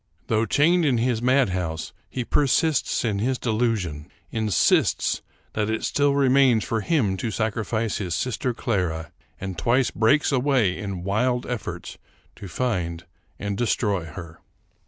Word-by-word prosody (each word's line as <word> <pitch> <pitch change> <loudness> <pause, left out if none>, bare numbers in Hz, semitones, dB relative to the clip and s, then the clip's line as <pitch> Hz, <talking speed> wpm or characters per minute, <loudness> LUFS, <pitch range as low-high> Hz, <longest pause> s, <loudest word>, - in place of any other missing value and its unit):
Though 110 +1 +2
chained 170 +4 +3
in 135 -6 +2
his 115 -1 0
madhouse, 95 -11 0 0.2
he 125 -2 -4
persists 145 0 +1
in 105 -3 0
his 130 +4 0
delusion; 110 -11 -1 0.2
in 110 -1 -1
sists 90 - +2 0.3
that 105 0 -1
it 110 0 -2
still 145 -1 +2
remains 135 -4 +4
for 115 -1 -1
him 105 - +1
to 115 - -2
sacrifice 110 0 -1
his 90 -5 -2
sister 125 +1 -1
Clara; 90 -9 -2 0.3
and 95 -3 -5
twice 120 +7 +2
breaks 145 +8 +3
away 125 -8 +2
in 100 -4 -5
wild 120 +6 0
efforts 125 -4 -5 0.4
to 100 - -8
find 90 -6 -2 0.3
and 100 -1 -3
destroy 100 -5 0
her. 80 0 -10
110 Hz, 140 wpm, -24 LUFS, 95-125 Hz, 0.4 s, remains